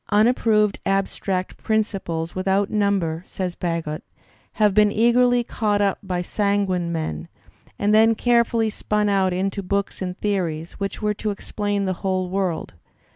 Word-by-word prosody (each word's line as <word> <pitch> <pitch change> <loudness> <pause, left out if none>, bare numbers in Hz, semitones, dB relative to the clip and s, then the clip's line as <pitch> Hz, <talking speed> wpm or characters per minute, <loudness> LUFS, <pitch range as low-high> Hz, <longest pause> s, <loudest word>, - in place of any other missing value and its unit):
"Unproved 215 -1 +3
abstract 195 -1 -1
principles 195 -7 -2
without 195 +1 0
number," 195 -6 0
says 185 -2 -3
Bagehot, 165 -3 -3 0.5
"have 210 -2 +3
been 210 0 +5
eagerly 240 +2 +3
caught 210 -3 0
up 200 -1 +1
by 180 -3 -2
sanguine 195 -3 0
men, 120 - -3 0.5
and 205 +1 +1
then 225 +1 +5
carefully 235 -1 +2
spun 210 0 0
out 190 -2 +2
into 195 +2 -1
books 200 +1 -2
and 180 0 -4
theories, 170 -6 -2
which 200 +2 -4
were 210 0 +2
to 215 +1 -3
explain 205 0 -2
the 190 - 0
whole 185 -1 -1
world. 190 -4 -2
200 Hz, 140 wpm, -23 LUFS, 185-210 Hz, 0.5 s, been